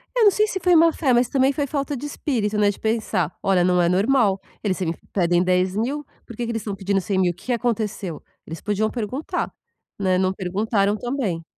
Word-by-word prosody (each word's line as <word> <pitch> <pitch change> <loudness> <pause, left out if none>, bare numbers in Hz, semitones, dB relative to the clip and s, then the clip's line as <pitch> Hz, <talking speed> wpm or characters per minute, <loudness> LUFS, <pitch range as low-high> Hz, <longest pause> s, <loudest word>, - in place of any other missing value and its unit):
Eu 475 - +4
não 410 - +7
sei 425 +2 +2
se 385 -2 -3
foi 360 -1 +5
má-fé 325 -4 +4
mas 240 0 +3
também 270 0 +3
foi 290 0 -1
falta 280 +1 -2
de 265 - -6
espírito, 225 -8 -2
né, 205 -1 +4
de - - -12
pensar: 220 -7 0
"Olha, 190 -2 +3
não 180 0 +3
é 170 - +3
normal. 200 0 +3 0.2
Eles 195 -4 0
sempre 170 -3 -3
pedem 175 -1 +2
10.000. 195 +11 0 0.2
Por 235 - -10
que 240 - -3
que 235 - -3
eles 225 - -2
estão 205 -1 -4
pedindo 195 0 0
100.000, 190 -2 +1
o - - -12
que 190 - -17
que 250 - +1
aconteceu?" 215 -7 -2 0.2
Eles 165 +1 -8
podiam 210 +1 0
perguntar. 245 +6 -3 0.5
Né, 185 -2 +2
não 185 0 +1
perguntaram 200 +2 0
também. 225 -10 -2
210 Hz, 210 wpm, -22 LUFS, 185-255 Hz, 0.5 s, não